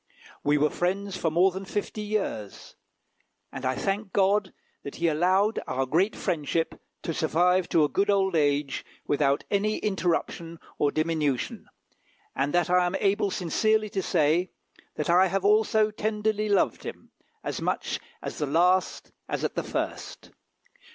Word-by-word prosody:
We 145 +1 +3
were 150 +1 +2
friends 195 +2 -1
for 170 -3 0
more 175 +4 +4
than 190 +2 -6
fifty 205 +2 -4
years; 205 - -4 0.8
and 135 - -7
I 130 0 0
thank 195 - -2
God 200 0 +2 0.3
that 140 - -8
he 170 - 0
allowed 185 +7 +2
our 130 +1 -1
great 175 +10 +1
friendship 165 +1 -2 0.2
to 165 - -2
survive 180 +4 +2
to 160 - +4
a - - +4
good 200 +6 0
old 190 -2 +2
age 145 -2 +1 0.2
without 140 -1 +1
any 210 +1 +1
interruption 175 -4 -2 0.2
or 145 - +3
diminution, 155 -5 -1 0.7
and 135 +2 0
that 175 +1 +2
I 180 0 +4
am 175 - -2
able 200 +1 +1
sincerely 215 +5 +1
to 195 - -1
say, 170 +1 +2 0.5
that 150 +2 -1
I 185 +2 +5
have 195 +1 -1
also 215 +1 +3
tenderly 215 0 -1
loved 200 -2 +2
him, - - -9 0.3
as - - -4
much - - -1 0.2
at - - -4
the 150 - -3
last 180 +5 +2 0.2
as - - -2
at - - -1
the - - -1
first. - - -5
180 Hz, 155 wpm, -27 LUFS, 155-200 Hz, 0.8 s, I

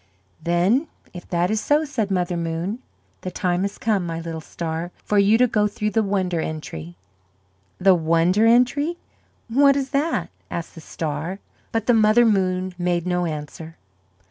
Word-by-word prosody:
"Then 185 - +2 0.3
if 175 -1 -10
that 175 +2 +1
is 215 -1 0
so," 300 +2 +2
said 235 -8 -2
Mother 180 -2 0
Moon, 170 +6 -3 0.4
"the 185 - -4
time 180 0 -1
has 200 +1 -2
come, 210 -4 0
my 165 -1 -4
little 165 -1 -5
star, 165 +1 -4 0.2
for 210 - +2
you 205 +3 +5
to 250 - +5
go 210 -3 +2
through 210 +1 -3
the 225 - +2
Wonder 190 -5 0
Entry." 85 - -6 0.8
"The 190 0 +5
Wonder 170 +5 +3
Entry? 270 +8 +3 0.5
What 275 +4 +4
is 275 -1 -2
that?" 295 +3 0 0.2
asked 170 -1 -5
the 165 - -11
star. 160 +4 -4 0.3
But 225 -1 -1
the 245 - +4
Mother 220 +2 +5
Moon 185 -3 +1
made 175 -1 0
no 180 -1 0
answer. 155 +1 -7
185 Hz, 165 wpm, -22 LUFS, 170-225 Hz, 0.8 s, you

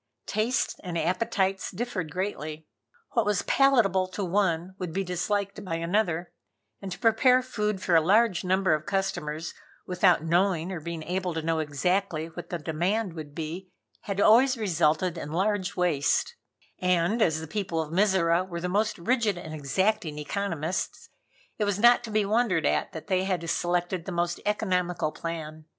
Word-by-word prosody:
Tastes 225 +4 0
and 175 -3 -3
appetites 190 +3 0
differed 190 -5 -4
greatly. 160 -4 -4 0.5
What 230 - +2
was 205 -1 0
palatable 225 -10 +3
to 185 +2 -4
one 180 -1 0
would 180 -3 -4
be 195 - 0
disliked 200 +3 -2
by 175 -4 -3
another, 175 0 0 0.5
and 195 -1 -6
to 180 - -5
prepare 250 +3 +4
food 210 -6 -2
for 175 - +2
a 165 - +7
large 200 +1 +3
number 185 -1 +2
of 155 0 -2
customers, 170 -5 -2 0.3
without 180 -2 +3
knowing 175 +1 +1
or 180 - -4
being 165 0 -6
able 180 0 -2
to 160 - -2
know 165 0 0
exactly 160 +2 -1
what 175 +1 -9
the 175 - -2
demand 175 +6 -1
would 150 -3 -9
be, 170 +3 -5 0.4
had 200 -1 -3
always 250 +5 +5
resulted 170 -3 +1
in 150 - -6
large 200 +2 0
waste, 180 - +1 0.4
and 180 +5 +1
as 160 -6 +3
the 160 - -6
people 170 -1 -3
of 160 0 -3
Mizora 185 -3 +3
were 175 -2 -6
the 180 - -2
most 210 +4 0
rigid 220 0 +1
and 160 -3 -7
exacting 165 +3 0
economists, 170 +1 -3 0.5
it 210 - +2
was 205 -2 0
not 240 +3 +6
to 230 - -6
be 215 -1 +1
wondered 210 -6 +1
at - - +1
that 160 - -7
they 185 -2 +1
had 180 -3 -2
selected 175 0 -1
the - - -4
most 175 0 -1
economical 180 -6 0
plan. 155 -1 -6
180 Hz, 170 wpm, -27 LUFS, 165-205 Hz, 0.5 s, a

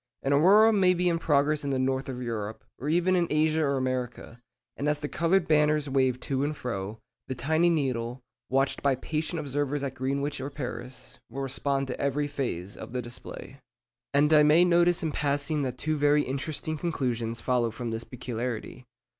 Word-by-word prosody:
An 135 - +2
aurora 205 +9 +6
may 185 -3 +4
be 180 +1 +1
in 170 -1 +2
progress 150 -1 +2
in 140 - -2
the 135 - 0
north 130 +1 0
of 125 -1 -5
Europe, 110 -2 -4 0.2
or 145 - -3
even 175 +3 +3
in 175 -2 +2
Asia 155 +1 +2
or 140 -2 +1
America, 125 -2 -3 0.3
and 145 +2 -1
as 150 - +1
the 145 0 -4
coloured 170 +4 +1
banners 150 -1 +3
wave 130 -2 +1
to 135 0 -1
and 150 +1 -2
fro, 105 -3 -4 0.3
the 130 - -3
tiny 160 +6 +2
needle, 130 -5 -1 0.3
watched 135 +1 +1
by 140 -2 +3
patient 160 +5 -3
observers 145 0 -2
at 135 -2 -3
Greenwich 140 +2 -2
or 135 - -4
Paris, 125 -2 -7
will 135 - -4
respond 135 +1 -1
to 130 - -5
every 140 +1 0
phase 120 -10 -4
of - - -9
the 125 - -1
display. 120 +3 -9 0.5
And 150 +2 +4
I 150 - +8
may 155 +4 +6
notice 175 0 +3
in 160 - 0
passing 145 +1 0
that 130 -2 -3
two 155 +3 -1
very 145 0 +4
interesting 150 +3 -3
conclusions 120 -9 -2
follow 125 -2 +1
from 120 +1 -5
this 115 +1 -4
peculiarity. 125 0 -5
140 Hz, 190 wpm, -28 LUFS, 125-155 Hz, 0.5 s, I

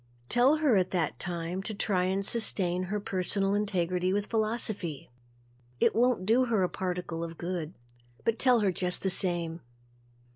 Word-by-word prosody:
Tell 250 +5 +4
her 295 -8 +3
at 185 -1 +1
that 175 -3 -1
time 175 +1 -3
to 215 +2 -5
try 190 -3 0
and 195 +1 -1
sustain 185 -6 +1
her 210 +3 -2
personal 195 0 0
integrity 185 -3 0
with 205 +1 0
philosophy. 215 - -1 0.7
It - - +3
won't 240 -5 +2
do 240 +5 +4
her 220 -5 +1
a 180 - +1
particle 180 -3 -4
of 165 -1 -7
good 175 -1 -4 0.5
but 230 0 +1
tell 250 -3 +4
her 200 -2 +2
just 180 0 -1
the 190 - +1
same. 170 -3 0
190 Hz, 160 wpm, -29 LUFS, 180-215 Hz, 0.7 s, Tell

